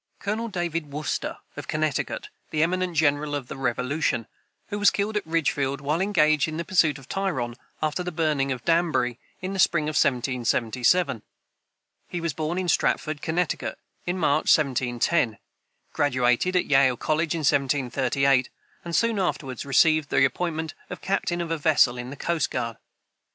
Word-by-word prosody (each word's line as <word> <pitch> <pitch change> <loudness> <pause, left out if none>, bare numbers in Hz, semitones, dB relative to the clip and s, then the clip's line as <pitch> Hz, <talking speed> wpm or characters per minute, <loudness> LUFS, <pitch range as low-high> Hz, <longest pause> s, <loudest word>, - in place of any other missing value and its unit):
[Footnote 200 - -6
31: - - -2
Colonel 230 - -3
David 170 -5 -3
Wooster, 150 +2 -3 0.2
of - - -7
Connecticut, - - -2 0.2
the 155 0 +1
eminent 180 0 -1
general 145 -1 +2
of 135 -4 -5
the - - -5
Revolution, 125 0 -1 0.4
who 205 - -3
was 205 - +6
killed 210 +1 -2
at 205 -5 -2
Ridgefield, 140 -4 0
while 150 +5 -1
engaged 155 -7 +3
in 155 0 -5
the 170 - -3
pursuit 155 -5 +3
of 135 -1 -14
Tryon, 155 -12 -2 0.3
after 155 +3 0
the 180 0 -3
burning 150 -4 0
of 125 -3 -4
Danbury, 160 -8 +1 0.2
in 185 +1 -3
the 195 - -4
spring 170 -4 +3
of 155 +1 -2
1777. 125 +2 +1 0.9
He 175 - -4
was 165 -2 -2
born 160 +4 -2
in 185 -1 -1
Stratford, 155 -2 +1
Connecticut, 170 +1 -1 0.3
in 175 +1 -1
March, 155 -3 +2
1710, 130 -2 0 0.6
graduated 130 +5 +2
at 180 - +3
Yale 135 -3 +4
college 155 +4 0
in 165 - -2
1738, 135 -2 +2 0.3
and 170 -1 -3
soon 230 -3 +2
afterward 135 -9 -2
received 155 +2 +3
the - - +4
appointment 160 +3 -2 0.2
of - - -6
captain 175 -3 -1
of 165 -1 -4
a 165 - -1
vessel 140 -5 +3
of 125 +1 -5
the 140 - -7
coast 165 +1 -1
guard. 115 -3 -3
155 Hz, 165 wpm, -25 LUFS, 135-170 Hz, 0.9 s, was